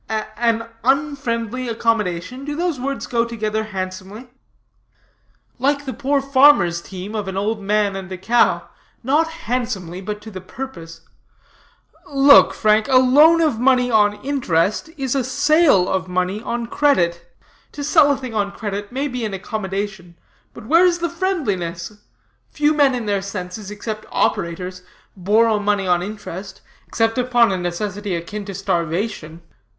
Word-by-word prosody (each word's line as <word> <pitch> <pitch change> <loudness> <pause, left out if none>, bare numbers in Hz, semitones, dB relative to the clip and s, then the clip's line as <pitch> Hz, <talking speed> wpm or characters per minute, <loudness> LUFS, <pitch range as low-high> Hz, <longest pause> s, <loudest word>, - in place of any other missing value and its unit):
"An 225 +1 -1 0.2
unfriendly 255 -3 -1
accommodation? 225 0 -1
Do 295 +1 -4
those 340 -4 -1
words 275 +2 -3
go 235 -1 0
together 220 -2 -3
handsomely?" 195 +4 -7 1.3
"Like 285 +2 0
the 260 - -4
poor 275 +2 0
farmer's 260 -11 +4
team, 190 +3 -8
of 210 -3 -3
an 190 0 -4
old 210 +2 -1
man 205 0 +1
and 190 -1 -7
a 185 - -4
cow 235 +6 +2 0.4
not 295 +6 +2
handsomely, 225 - -4
but 210 +2 -5
to 220 - -10
the 185 -2 -8
purpose. 170 -7 -9 1.1
Look, 280 0 +6
Frank, 215 0 +2
a 265 - +2
loan 295 +6 +6
of 300 -9 +1
money 250 -1 +3
on 210 -2 +4
interest 215 - 0
is 265 -3 -2
a 270 -2 0
sale 280 - +3
of 185 -1 -1
money 185 +3 -1
on 235 0 -3
credit. 175 -11 +1 0.4
To 290 - -6
sell 290 0 +5
a 280 - 0
thing 255 -3 -7
on 200 -2 -1
credit 205 -1 -5
may 270 +3 -2
be 250 -3 -4
an 210 -3 -3
accommodation, 195 -2 -5 0.4
but - - -11
where 330 +8 +5
is 355 -1 +3
the 340 0 -2
friendliness? 205 - -2 0.6
Few 300 0 +1
men 285 -4 +3
in 240 -3 -4
their 200 -2 0
senses, 195 +1 -6
except 215 +1 -6
operators, 180 -1 -1 0.3
borrow 210 +3 +2
money 205 -1 0
on 175 -1 +2
interest, 195 -1 -7 0.3
except 225 +1 0
upon 245 -3 +3
a 190 - -1
necessity 185 +2 -3
akin 200 +5 -6
to 195 -1 -7
starvation. 170 -2 -3
215 Hz, 150 wpm, -20 LUFS, 190-265 Hz, 1.3 s, Look